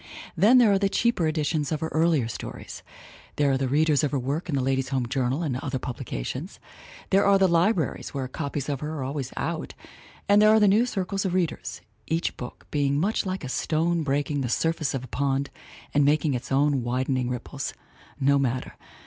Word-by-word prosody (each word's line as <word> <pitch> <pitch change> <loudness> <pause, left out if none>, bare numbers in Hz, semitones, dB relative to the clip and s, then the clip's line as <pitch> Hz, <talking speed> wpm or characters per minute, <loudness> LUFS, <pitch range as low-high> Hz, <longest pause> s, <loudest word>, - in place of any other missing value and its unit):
Then 215 +9 +6
there 235 -4 +6
are 195 - +3
the 200 0 +2
cheaper 230 -7 +1
editions 155 -1 -1
of 155 - -1
her 160 - -2
earlier 160 -6 +2
stories; 115 - -7 0.5
there 145 -1 +2
are 135 - +2
the 135 - 0
readers 150 +2 +2
of 145 - +2
her 140 - -1
work 140 +7 -3
in 145 - 0
the 135 - +1
Ladies' 135 0 0
Home 130 -2 0
Journal 130 +5 -1
and 135 -6 -1
other 135 -1 -3
publications; 120 - -5 0.5
there 195 +1 +5
are 200 0 +5
the 190 -1 +4
libraries 170 -1 +1
where 135 -2 -3
copies 140 +1 -4
of 140 -3 -2
her 155 +2 -4
are 135 - -3
always 135 0 -4
"out" - - -3 0.5
and 205 +1 +5
there 215 - +7
are 220 0 +6
new 210 +3 +4
circles 195 -3 -2
of 185 -2 -1
readers, 160 - -2 0.3
each 165 +2 -1
book 125 - -9
being 140 -1 +1
much 200 +3 0
like 185 -1 -3
a - - -4
stone 165 +5 0
breaking 145 0 -1
the 125 - -2
surface 160 0 0
of 130 - -3
a - - -8
pond 140 +2 -1 0.4
and 145 - +4
making 150 +1 +2
its 125 +2 -5
own 140 0 +2
widening 125 +1 -1
ripples; 125 -1 -5 0.4
no 140 0 +3
matter. 130 -1 -1
145 Hz, 200 wpm, -26 LUFS, 135-170 Hz, 0.5 s, there